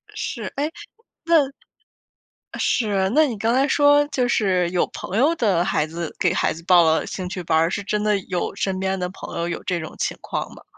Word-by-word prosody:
是， - - -4 0.2
哎， 300 +3 -1 0.5
那 320 -5 +3 1.1
是。 200 -4 +1
那 310 0 +6
你 245 -6 -3
刚 230 +2 +1
才 270 +3 +3
说 290 +1 +4
就 250 -4 0
是 185 -6 +1
有 180 -1 +1
朋 195 - -5
友 295 +7 +4
的 195 - +2
孩 155 -5 0
子 165 0 -6
给 175 - +2
孩 - - +1
子 165 - -10
报 175 -1 +6
了 160 0 +2
兴 185 -1 -5
趣 180 0 -5
班 160 -1 +1
儿， 165 +1 +3
是 200 - -2
真 210 +1 -1
的 210 -1 +2
有 180 +1 -2
身 190 -1 -2
边 190 0 -1
的 180 0 -2
朋 190 - -9
友 170 +1 -2
有 170 - -5
这 180 -2 -1
种 160 - -8
情 - - -2
况 - - -4
吗？ - - -15
190 Hz, 230 characters per minute, -22 LUFS, 175-245 Hz, 1.1 s, 那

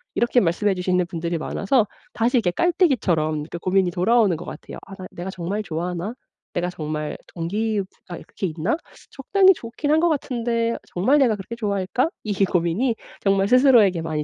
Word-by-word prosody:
이렇게 240 +1 +3
말씀해 195 +2 +1
주시는 180 -1 0
분들이 170 -1 -3
많아서 210 - +1 0.3
다시 235 +3 +2
이렇게 190 -6 +2
깔때기처럼 180 - +1
이렇게 165 +3 -7
고민이 185 +1 +1
돌아오는 205 +1 +3
것 165 - -8
같아요. - - -9
'아 195 - -9
나 185 -1 -9
내가 175 +2 -6
정말 190 +3 -3
좋아하나? 175 +4 -4 0.4
내가 175 0 -1
정말 150 -2 -4 0.2
동기 205 +6 -1
부 - - -6 0.2
가 175 - -5
그렇게 190 - -5
있나? 165 - -1 0.4
적당히 380 +7 +4
좋긴 265 0 -5
한 310 - +4
것 345 - +3
같은데 235 -5 -1 0.2
정말 250 +12 +3
내가 245 -6 +3
그렇게 210 +4 -7
좋아할까?' 205 - -1
이 215 - -2
고민이 180 +7 0 0.3
정말 195 0 +2
스스로에게 235 -8 +5
많이 155 -2 -2
195 Hz, 405 characters per minute, -23 LUFS, 175-235 Hz, 0.4 s, 스스로에게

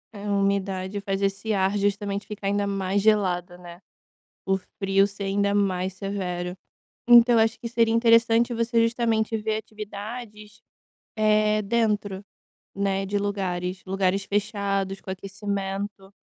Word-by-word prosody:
É 200 0 -8
a 205 - -1
umidade 195 0 0
faz 195 0 -2
esse 195 +2 -1
ar 195 +1 +1
justamente 200 0 -1
ficar 210 -1 -7
ainda 200 0 +1
mais 195 0 0
gelado, 185 -4 +1
né. 175 0 -12 0.7
O 190 0 +2 0.2
frio 195 0 +3
ser 200 0 -7
ainda 200 +1 +1
mais 190 -2 0
severo. 185 -2 -4 0.5
Então 240 0 +8
eu - - +5
acho 225 +1 -2
que - - -7
seria 230 -1 +2
interessante 230 0 +4
você 230 0 +1
justamente 230 -1 0
ver 215 0 -1
atividades, 215 0 -8 0.6
eh, 215 0 +3
dentro, 205 -3 0 0.5
né, 195 0 -1
de 205 +1 -1
lugares, 185 -2 -2
lugares 195 0 0
fechados, 195 -1 -1
com 190 - -6
aquecimento. 195 0 -5
200 Hz, 135 wpm, -25 LUFS, 195-215 Hz, 0.7 s, Então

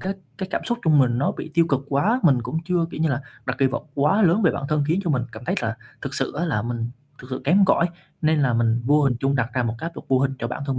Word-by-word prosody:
cái 190 +1 -2 0.3
cái 190 -1 -4
cảm - - 0
xúc 240 0 -1
trong 155 -2 +5
mình 120 -2 +3
nó 140 - +1
bị - - -7
tiêu 165 -1 +4
cực 135 -3 +1
quá, 205 - +2
mình 135 -7 +4
cũng 125 +7 -3
chưa, 180 -2 +1
kiểu - - -6
như 160 - +2
là, 140 -1 -1 0.3
đặt - - -2
kỳ 135 - +4
vọng 135 +2 -3
quá 170 +10 +3
lớn 180 +5 +4
về 175 - +5
bản - - -4
thân, 150 -1 +1
khiến 165 +5 +1
cho 170 - 0
mình 125 -4 +1
cảm 115 +2 -9
thấy - - 0
là 115 -1 -2 0.3
thực - - -4
sự - - -1
á 170 - 0
là 115 -10 0
mình 120 -1 -3 0.3
thực 125 - -11
sự 130 - -3
kém 190 +7 +5
cỏi, 180 -2 +3 0.4
nên 155 0 +3
là 130 -3 +2
mình 115 0 +2
vô 145 +4 +4
hình 135 -4 +2
trung 135 +1 +1
đặt 125 -3 0
ra 130 - +1
một 115 -1 -1
cái 165 - -3
áp - - -25
lực - - -8
vô 130 - +4
hình 135 0 +1
cho 115 - -3
bản 125 +4 -5
thân 135 -2 -1
140 Hz, 315 wpm, -23 LUFS, 125-165 Hz, 0.4 s, trong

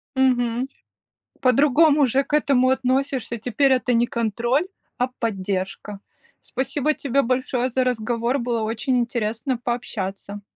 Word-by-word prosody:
Мгм. 250 -1 +1 0.7
По-другому 285 +3 +4
же 265 +2 +1
к 290 - -11
этому 275 -4 +3
относишься. 260 -2 0
Теперь 255 +4 +2
это 250 -1 +1
не 235 +1 +3
контроль, 235 - 0 0.3
а 250 - +1
поддержка. 195 -2 -3 0.4
Спасибо 270 +3 -1
тебе 275 -2 0
большое 255 0 0
за 255 +1 +1
разговор. 240 +1 -1
Было 235 -2 -1
очень 230 +4 -1
интересно 235 +2 -2
пообщаться. 205 -4 -4
250 Hz, 120 wpm, -23 LUFS, 230-265 Hz, 0.7 s, По-другому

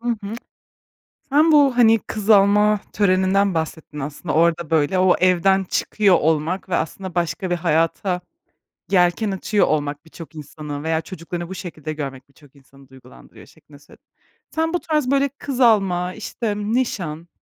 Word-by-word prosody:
Hı 240 - -5
hı. 215 -2 -3 1.0
Sen 305 +3 +4
bu, 280 -4 +4
hani, 225 -2 +5
kız 215 -1 -5
alma 210 0 +5
töreninden 195 0 +2
bahsettin, 160 -2 -5
aslında, 145 +3 -5
orada, 170 0 +2
böyle, 160 +3 +1
o 185 -1 +4
evden 185 +1 +3
çıkıyor 195 +1 +1
olmak 160 +4 0
ve 180 - 0
aslında 185 +2 -4
başka 175 +2 -2
bir 175 - +1
hayata 170 +2 0 0.7
yelken 180 +3 +2
açıyor 195 +2 +1
olmak 145 -1 -2
birçok 165 0 -12
insanı 150 -1 -8
veya 160 0 0
çocuklarını 170 -1 -7
bu 190 - -6
şekilde 160 -4 -7
görmek 135 -3 -7
birçok 140 0 -22
insanı 135 0 -20
duygulandırıyor 130 -1 -16
şeklinde 145 -1 -19
söyledin. 145 - -21 0.5
Sen 320 +1 -1
bu 355 - +1
tarz, 300 -5 -1
böyle, 280 0 +2
kız 275 -1 -6
alma, 190 -6 +2
işte, 215 -1 -4
nişan, 205 -8 -2
180 Hz, 150 wpm, -21 LUFS, 160-210 Hz, 1.0 s, hani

